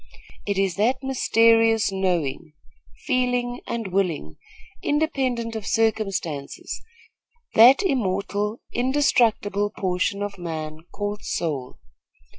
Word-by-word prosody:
It 200 Hz, -1 st, 0 dB
is 195 Hz, -2 st, 0 dB
that 255 Hz, +6 st, +1 dB
mysterious 225 Hz, -4 st, +3 dB
knowing, 175 Hz, -7 st, -1 dB, 0.5 s
feeling 245 Hz, -2 st, 0 dB
and 230 Hz, -4 st, -3 dB
willing, 170 Hz, -, -1 dB, 0.4 s
independent 260 Hz, -7 st, 0 dB
of 215 Hz, -2 st, -5 dB
circumstances; 195 Hz, -10 st, -1 dB, 0.7 s
that 250 Hz, -, +7 dB
immortal, 210 Hz, -, -1 dB
indestructible 240 Hz, -6 st, +2 dB
portion 195 Hz, 0 st, -1 dB
of 200 Hz, -2 st, -5 dB
man 155 Hz, -2 st, -5 dB
called 205 Hz, 0 st, -4 dB
soul. 140 Hz, -6 st, -3 dB
210 Hz, 90 wpm, -24 LUFS, 185-245 Hz, 0.7 s, that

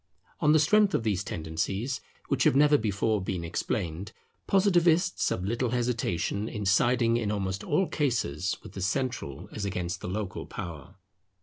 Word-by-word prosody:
On 150 Hz, -, +4 dB
the 155 Hz, -, +6 dB
strength 200 Hz, +7 st, +4 dB
of -, -, 0 dB
these 100 Hz, -4 st, 0 dB
tendencies, 95 Hz, -, -3 dB, 0.3 s
which -, -, +1 dB
have -, -, +4 dB
never 145 Hz, +1 st, +6 dB
before 110 Hz, -2 st, +1 dB
been 90 Hz, -2 st, -3 dB
explained, 85 Hz, +2 st, -3 dB, 0.3 s
Positivists 180 Hz, -3 st, +3 dB
have 90 Hz, -, -2 dB
little 115 Hz, +5 st, 0 dB
hesitation 115 Hz, -4 st, -1 dB
in 105 Hz, -3 st, -4 dB
siding 115 Hz, +4 st, +3 dB
in 110 Hz, -3 st, -1 dB
almost 95 Hz, -2 st, -2 dB
all 190 Hz, -, +2 dB
cases 100 Hz, -, -1 dB
with -, -, -10 dB
the 95 Hz, -, -7 dB
central 95 Hz, -, -2 dB
as 105 Hz, -, -5 dB
against 90 Hz, -3 st, -3 dB
the -, -, -5 dB
local 100 Hz, 0 st, -4 dB
power. 85 Hz, +3 st, -8 dB
105 Hz, 160 wpm, -28 LUFS, 95-130 Hz, 0.3 s, the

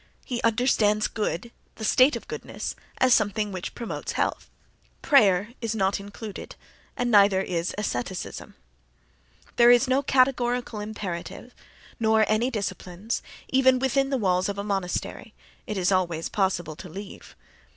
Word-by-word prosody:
He 245 Hz, -2 st, -3 dB
understands 220 Hz, -2 st, +2 dB
good, 215 Hz, +1 st, -3 dB, 0.2 s
the 220 Hz, -, -5 dB
state 255 Hz, +6 st, +5 dB
of -, -, -7 dB
goodness, -, -, -6 dB, 0.2 s
as 255 Hz, -1 st, +4 dB
something 210 Hz, -1 st, +1 dB
which 185 Hz, -2 st, -6 dB
promotes 235 Hz, -2 st, -5 dB
health. -, -, -2 dB, 0.5 s
Prayer 205 Hz, -, +4 dB
is 225 Hz, -2 st, -2 dB
not 195 Hz, -1 st, +1 dB
included, 205 Hz, +1 st, -8 dB, 0.4 s
and 245 Hz, -1 st, 0 dB
neither 200 Hz, -2 st, +6 dB
is 175 Hz, -2 st, -2 dB
asceticism. 185 Hz, -, -4 dB, 1.0 s
There 240 Hz, 0 st, +7 dB
is 245 Hz, +2 st, +6 dB
no 260 Hz, +2 st, +2 dB
categorical 250 Hz, -4 st, +1 dB
imperative 210 Hz, +2 st, -6 dB, 0.5 s
nor 220 Hz, -1 st, +3 dB
any 220 Hz, +4 st, +1 dB
disciplines, 205 Hz, -2 st, -4 dB, 0.3 s
even 260 Hz, -1 st, +4 dB
within 270 Hz, +1 st, +1 dB
the 270 Hz, -, 0 dB
walls 185 Hz, -3 st, +1 dB
of 200 Hz, -, -4 dB
a 200 Hz, -, -3 dB
monastery 195 Hz, -, -3 dB, 0.3 s
(—it 210 Hz, -, -3 dB
is 180 Hz, 0 st, +1 dB
always 175 Hz, -4 st, 0 dB
possible 180 Hz, -5 st, -1 dB
to 185 Hz, -, -9 dB
leave—). 195 Hz, +4 st, -10 dB
210 Hz, 140 wpm, -25 LUFS, 190-245 Hz, 1.0 s, There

